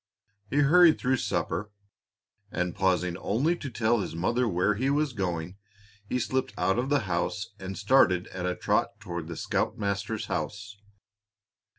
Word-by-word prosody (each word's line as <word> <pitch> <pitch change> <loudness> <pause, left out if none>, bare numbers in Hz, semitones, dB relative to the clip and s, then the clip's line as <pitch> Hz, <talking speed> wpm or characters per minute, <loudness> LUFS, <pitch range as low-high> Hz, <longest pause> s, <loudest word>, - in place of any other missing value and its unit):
He 145 - +2
hurried 165 +3 +6
through 130 +1 +1
supper, 105 -2 -2 0.8
and 90 -1 -1
pausing 90 -2 +1
only 135 - +1
to 140 - -6
tell 115 -1 +1
his 95 - -4
mother 120 +9 +1
where 95 +1 +2
he 130 +7 0
was 145 -1 +1
going, 90 -3 -3 0.5
he - - 0
slipped 130 +2 -1
out 95 +5 +1
of 130 +2 -1
the 145 -2 +3
house 100 +3 -2
and 95 0 -6
started 100 -6 +4
at 90 -1 -4
a 90 - -1
trot - - 0
toward 85 -2 -5
the 85 -1 -6
scoutmaster's 105 0 -2
house. 100 +5 -4
105 Hz, 155 wpm, -28 LUFS, 90-125 Hz, 0.8 s, hurried